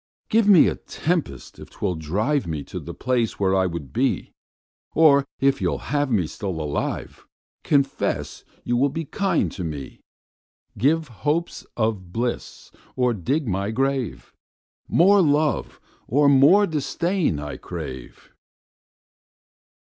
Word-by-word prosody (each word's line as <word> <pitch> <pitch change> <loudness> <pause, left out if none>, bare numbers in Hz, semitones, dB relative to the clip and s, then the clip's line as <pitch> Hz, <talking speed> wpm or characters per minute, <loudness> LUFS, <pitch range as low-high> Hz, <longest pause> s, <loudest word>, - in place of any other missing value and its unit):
Give 225 -1 +3
me 195 -6 +7
a - - +1
tempest 160 - -3
if - - -11
'twill 90 - -2
drive 100 - -1
Me 80 -3 -3
to 90 - -7
the 85 +1 -8
place 125 -3 -1
where 95 -1 +2
I 95 -1 +2
would 85 -6 -6
be; - - 0 0.6
Or 140 -3 +5
if 140 0 +2
you'll - - 0 0.2
have 145 -1 +1
me 105 -8 +1
still 95 +1 -5
alive, 75 -2 -4 0.4
Confess 140 -2 0 0.2
you 120 - 0
will 140 +3 +3
be 160 +4 -4
kind 195 +6 0
to 95 - -6
me. 75 -5 -6 0.7
10 - - -15
Give 155 +6 +2
hopes 150 +8 -2
of 110 -6 -1
bliss 120 +4 -4 0.2
or 125 -1 +2
dig 135 - -1
my 100 0 -1
grave: 135 +1 -2 0.5
More 195 +4 +5
love 150 -2 +1 0.3
or 145 +4 +3
more 140 +9 +6
disdain 170 - -1
I 75 0 -6
crave. 65 -2 -8
130 Hz, 135 wpm, -23 LUFS, 95-150 Hz, 0.7 s, me